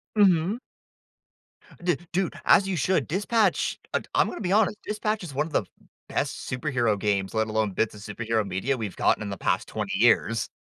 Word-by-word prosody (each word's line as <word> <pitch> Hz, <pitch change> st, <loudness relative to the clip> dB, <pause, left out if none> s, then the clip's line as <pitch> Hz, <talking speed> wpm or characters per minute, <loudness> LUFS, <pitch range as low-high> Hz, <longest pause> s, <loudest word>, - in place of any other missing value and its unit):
Mhm. 195 Hz, +1 st, +4 dB, 1.2 s
D 175 Hz, -4 st, +2 dB
Dude, 185 Hz, 0 st, 0 dB
as 195 Hz, -, +6 dB
you 195 Hz, -, -1 dB
should. 160 Hz, -3 st, +1 dB
Dispatch 205 Hz, +3 st, +1 dB
I -, -, +1 dB
I'm -, -, +4 dB
gonna -, -, -6 dB
be 185 Hz, -3 st, -1 dB
honest. 210 Hz, 0 st, +3 dB
Dispatch 215 Hz, 0 st, -2 dB
is 160 Hz, -6 st, -7 dB
one 145 Hz, +3 st, 0 dB
of 160 Hz, -, -13 dB
the 105 Hz, -, +1 dB, 0.4 s
best -, -, -2 dB
superhero 125 Hz, -5 st, 0 dB
games, 100 Hz, -1 st, 0 dB
let 110 Hz, 0 st, +1 dB
alone 110 Hz, -1 st, 0 dB
bits 110 Hz, +3 st, 0 dB
of 105 Hz, -, -11 dB
superhero 110 Hz, +1 st, -2 dB
media 95 Hz, +9 st, -1 dB
we've 110 Hz, -5 st, -5 dB
gotten -, -, +2 dB
in 105 Hz, -, -5 dB
the 100 Hz, -, -5 dB
past -, -, 0 dB
20 -, -, -4 dB
years. 110 Hz, -1 st, +3 dB
130 Hz, 185 wpm, -26 LUFS, -, 1.2 s, as